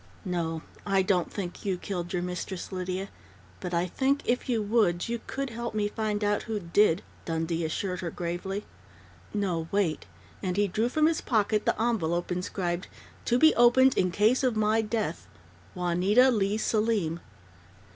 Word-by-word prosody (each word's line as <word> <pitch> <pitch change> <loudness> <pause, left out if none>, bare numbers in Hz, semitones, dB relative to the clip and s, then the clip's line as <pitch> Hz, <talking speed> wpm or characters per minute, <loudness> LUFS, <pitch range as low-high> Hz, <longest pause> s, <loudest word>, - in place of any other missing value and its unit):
"No, 165 -3 -2 0.2
I 195 -1 +2
don't 185 -2 +1
think 180 -4 -5
you 190 -3 0
killed 175 -2 -4
your 180 -1 -1
mistress, 180 +1 -5
Lydia, 185 +1 -3 0.5
but 180 - -5
I 170 0 +1
think, 270 +9 0
if 250 +1 0
you 235 -3 +2
would, 205 -5 +2
you 235 0 -3
could 275 -2 -3
help 235 0 -5
me 210 -1 +1
find 210 -1 -2
out 205 0 +1
who 215 -1 -1
did," 185 0 +3 0.2
Dundee 165 0 -1
assured 180 +3 -2
her 175 - -3
gravely. 175 +4 -4 0.7
"No, 180 -6 -1
wait!" 195 -6 0 0.3
and 185 -1 -2
he 205 0 +3
drew 220 +5 0
from 310 +4 +2
his 325 0 +2
pocket 215 -2 +1
the - - +1
envelope 175 -7 0
inscribed: 180 0 -2 0.4
"To 240 - +3
Be 315 +4 +6
Opened 255 +2 +5
In 185 - +2
Case 215 +9 +3
of 250 -4 +1
My 215 +1 +3
Death 215 -6 -3 0.5
Juanita 185 +9 +4
Leigh 205 -2 +1
Selim." 210 -7 0
200 Hz, 165 wpm, -28 LUFS, 175-225 Hz, 0.7 s, Be